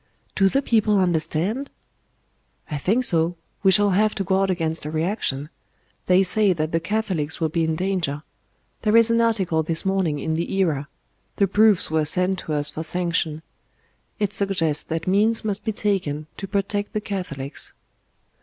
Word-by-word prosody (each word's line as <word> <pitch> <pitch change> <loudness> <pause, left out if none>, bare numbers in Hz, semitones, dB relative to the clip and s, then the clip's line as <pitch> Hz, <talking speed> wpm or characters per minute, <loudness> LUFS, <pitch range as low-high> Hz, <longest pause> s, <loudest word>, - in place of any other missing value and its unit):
"Do 195 -1 +3
the 275 +7 0
people 215 -4 +2
understand?" 180 - 0 1.0
"I 150 - -1
think 215 - +1
so. 170 -5 +2 0.3
We 195 - +5
shall 205 0 +4
have 210 +3 +2
to 195 - -1
guard 195 0 +1
against 165 -3 -1
a 150 - -4
reaction. 155 -3 -2 0.6
They 185 +1 +5
say 200 +1 +3
that 155 -1 -2
the 165 - +1
Catholics 185 -5 -2
will 160 - 0
be 165 +1 0
in 160 0 0
danger. 175 -5 -2 0.6
There 215 +1 +3
is 230 0 +6
an 230 0 +3
article 195 -8 +1
this 160 +3 0
morning 190 -6 0
in 160 +2 -2
the 165 +2 -2
Era. 155 -7 0 0.5
The 200 - +3
proofs 205 -2 +3
were 155 -1 +1
sent 180 +4 +2
to 155 - -5
us 145 0 -1
for 160 - -5
sanction. 165 -2 -1 0.7
It 205 -1 -1
suggests 185 -7 +1
that 165 0 -3
means 215 +4 +2
must 205 -1 -2
be 220 - -1
taken 185 -8 -1
to 195 - -5
protect 200 +1 -2
the 215 - -1
Catholics." 165 -10 -4
185 Hz, 170 wpm, -23 LUFS, 160-205 Hz, 1.0 s, is